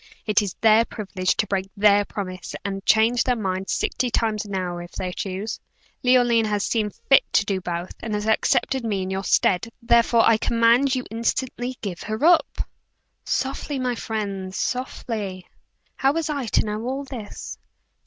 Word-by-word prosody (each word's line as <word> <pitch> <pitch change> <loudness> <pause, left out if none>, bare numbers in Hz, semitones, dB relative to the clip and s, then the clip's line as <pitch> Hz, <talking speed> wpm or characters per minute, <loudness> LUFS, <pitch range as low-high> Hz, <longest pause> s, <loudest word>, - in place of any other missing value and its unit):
"It 210 0 +3
is 200 -3 -4
their 220 +1 +6
privilege 195 -5 -2
to 215 - +2
break 195 -1 -2
their 205 0 +5
promise 185 -4 -6
and 195 -1 -3
change 225 +2 +4
their 250 - +1
mind 190 -3 -3
sixty 250 -1 0
times 220 -2 0
an 200 -1 -5
hour, 175 -2 -3
if 175 - -11
they 180 -1 -4
choose. 195 +4 -4 0.4
Leoline 245 -3 +4
has 205 -1 0
seen 215 -3 0
fit 270 +6 +4
to 200 - +4
do 195 -2 -1
both, 175 0 -4
and 220 -2 -3
has 210 0 -2
accepted 235 +3 +1
me 205 -4 -1
in 185 - -4
your 190 +1 -2
stead; 190 +3 +2
therefore 235 -1 +4
I 230 - +5
command 235 +4 +3
you 255 - -3
instantly 245 +2 -2
to - - -41
give 190 -5 -5
her 220 +6 -2
up!" 345 -1 +3 0.6
"Softly, 275 +1 -2
my 255 -1 0
friend 200 -5 -4
softly. 215 -7 -3 0.5
How 270 +1 +3
was 320 -1 -1
I 280 -5 -3
to - - +2
know 210 0 -3
all 265 +3 -2
this?" 245 -7 -8
220 Hz, 175 wpm, -23 LUFS, 195-245 Hz, 0.6 s, their